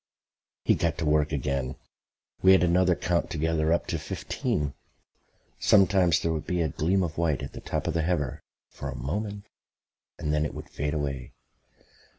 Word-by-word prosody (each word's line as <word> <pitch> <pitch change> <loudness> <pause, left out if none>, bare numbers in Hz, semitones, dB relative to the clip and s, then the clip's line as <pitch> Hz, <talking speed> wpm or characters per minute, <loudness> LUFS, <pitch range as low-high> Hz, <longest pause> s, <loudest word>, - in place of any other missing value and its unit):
He - - +5
got 80 -3 0
to 85 - -2
work 75 0 +2
again. 70 -2 -1 0.7
We 95 0 +7
had 95 - +5
another 90 +1 +4
count 85 +1 0
together 80 0 0
up 85 - +2
to - - -2
fifteen. 75 -2 -2 0.9
Sometimes 95 -5 +5
there 80 - 0
would 80 -1 -4
be 90 -2 +1
a 80 - 0
gleam 90 +7 +1
of 80 -2 -3
white 80 -6 +1
at - - -6
the - - -8
top - - -3
of - - 0
the 80 - +1
heather 80 -6 -1 0.3
for - - -7
a - - -5
moment 100 - -4 0.7
and 75 -3 -2
then 75 0 +2
it 75 - -3
would - - -9
fade 75 +2 -2
away. 70 -4 -3
80 Hz, 175 wpm, -27 LUFS, 75-90 Hz, 0.9 s, We